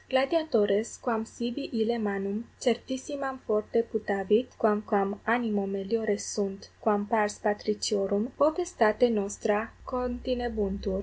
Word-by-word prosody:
Gladiatores, 260 -7 +2
quam 225 -3 0
sibi 240 +5 -4 0.2
ille 235 +2 +2
manum 200 0 -2 0.3
certissimam 260 +3 -1
fore 215 +2 +1
putavit 210 +2 +1
quamquam 210 -2 +2 0.3
animo 215 -5 0
meliore 210 +1 0
sunt 200 -2 -4
quam 205 -2 +2
pars 210 -1 +1
patriciorum, 210 +1 0
potestate 285 -8 +4
nostra 205 +1 0 0.3
continebuntur. 245 -6 -2
220 Hz, 100 wpm, -29 LUFS, 205-245 Hz, 0.3 s, potestate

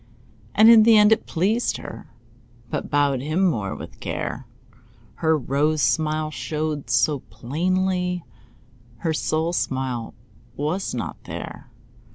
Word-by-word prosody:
And 215 +2 +7
in 230 -1 +9
the 225 0 +6
end 210 +1 +6
it 220 - +2
pleased 205 +8 0
her, - - -9 0.6
But - - -3
bowed 145 -3 +2
him 155 +7 +1
more 105 - -1
with - - -10
care. - - -4 0.7
Her 160 -1 +2
rose 145 +3 0
smile 155 +1 +1
showed 150 +3 -3
so 150 -3 +2
plainly, 180 +7 -1 0.7
Her 160 +7 -1
soul 160 +2 0
smile 130 -7 -2 0.4
was 155 +8 -2
not - - -5
there. - - -8
155 Hz, 125 wpm, -23 LUFS, 140-185 Hz, 0.7 s, in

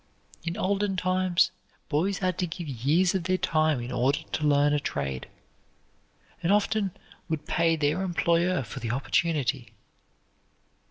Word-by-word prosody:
In 165 +1 -4
olden 200 0 0
times 185 0 +2 0.4
boys 170 +6 0
had 185 -2 -1
to 180 - 0
give 170 0 -6
years 145 +8 +2
of 185 -3 -1
their 185 +1 +2
time 155 -5 +1
in 120 +1 -5
order 130 +6 +1
to 150 - 0
learn 145 0 +4
a 150 - +2
trade, 70 - -3 1.1
and 175 +1 +1
often 210 0 +2 0.4
would 155 -2 -2
pay 165 -1 +2
their 155 +3 0
employer 175 -2 +1
for 110 - -7
the 115 - -4
opportunity. 135 -2 0
165 Hz, 145 wpm, -27 LUFS, 145-185 Hz, 1.1 s, learn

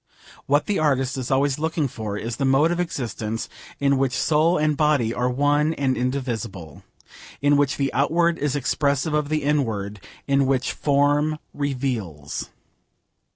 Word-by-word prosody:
What 145 +2 +3
the 205 - 0
artist 135 -4 +1
is 130 -2 -4
always 135 +1 +1
looking 160 -1 0
for 110 -4 -5
is 115 +1 -4
the - - -2
mode 135 +5 +3
of 175 - -1
existence 115 -9 -3 0.3
in 140 -1 +2
which 135 -2 0
soul 160 +3 +3
and 155 0 +1
body 140 -6 +2
are 125 +1 0
one 145 +4 +2
and 135 -2 0
indivisible: 115 - -4 0.6
in 145 +1 +3
which 145 -1 +2
the 135 -1 -1
outward 165 +5 +2
is 145 -1 0
expressive 140 +2 0
of 150 -1 0
the 155 -1 0
inward: 110 -9 -1 0.3
in 140 -1 +3
which 130 -2 +1
form 145 +2 +2 0.2
reveals. 125 - -3
140 Hz, 155 wpm, -23 LUFS, 125-150 Hz, 0.6 s, What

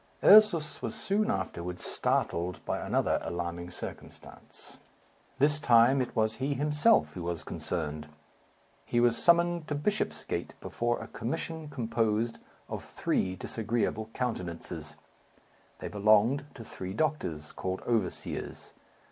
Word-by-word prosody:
Ursus 200 -7 +6
was 115 - -3
soon 210 +2 0
afterwards 90 - -3
startled 85 +2 0
by - - -1
another - - +1
alarming 85 0 -4
circumstance. 90 - -10 0.6
This 145 +2 +3
time 125 +1 +5
it 125 - -4
was 110 0 +1
he 140 +2 -1
himself 150 - +3
who 90 - -6
was 85 -2 -3
concerned. 75 -2 -4 0.8
He 120 - 0
was 120 -1 +4
summoned 170 0 +3
to 150 - -2
Bishopsgate 205 +9 -2
before 120 0 -1
a - - -7
commission 155 +8 -4
composed 115 -3 -1 0.3
of - - -5
three 95 0 -1
disagreeable 110 +1 -2
countenances. 85 - -4 0.8
They - - -6
belonged 110 +7 +3
to 115 - -8
three 95 -3 -6
doctors, 90 - -2
called 95 0 -4
overseers. 115 -2 -3
115 Hz, 120 wpm, -30 LUFS, 90-145 Hz, 0.8 s, Ursus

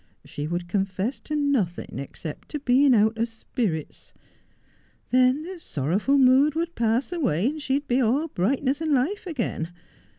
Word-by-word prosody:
She 145 +1 -5
would 175 +1 -3
confess 195 +5 -2
to 300 - -5
nothing 265 - -1
except 145 +3 -8
to 300 - -4
being 265 0 +4
out 220 +1 +2
of 230 - +1
spirits. 220 - -4 1.0
Then 255 +3 +4
the 365 +1 -8
sorrowful 195 - 0
mood 270 +3 +5
would 335 +1 -2
pass 235 +4 0
away, 250 - 0
and 300 +4 -1
she 270 -2 0
would 290 +1 -2
be 250 +2 +2
all 265 +7 +2
brightness 270 - 0
and 310 -3 +2
life 355 +11 -1
again. 230 - -3
255 Hz, 160 wpm, -25 LUFS, 200-290 Hz, 1.0 s, mood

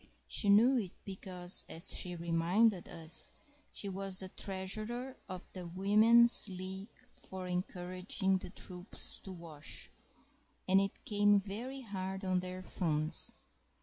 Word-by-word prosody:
She 205 - +1
knew 240 +6 +6
it 190 -6 -5
because—as 180 -2 0
she 180 -1 0
reminded 175 +4 +1
us—she 190 - -3
was 195 0 -2
the 190 0 0
treasurer 215 +8 -3
of 185 -1 -7
the 180 -2 -7
"Women's 215 +6 +6
League 190 +2 -7 0.2
for 190 -1 -8
Encouraging 185 +1 -1
the - - -9
Troops 180 0 -3
to 190 - -10
Wash," 165 -4 -7 0.8
and 190 +1 +5
it 195 0 -5
came 205 -1 +4
very 225 +8 -5
hard 190 -3 -5
on 185 -1 +1
their 185 0 -7
funds. 155 -4 +1
190 Hz, 120 wpm, -33 LUFS, 180-205 Hz, 0.8 s, knew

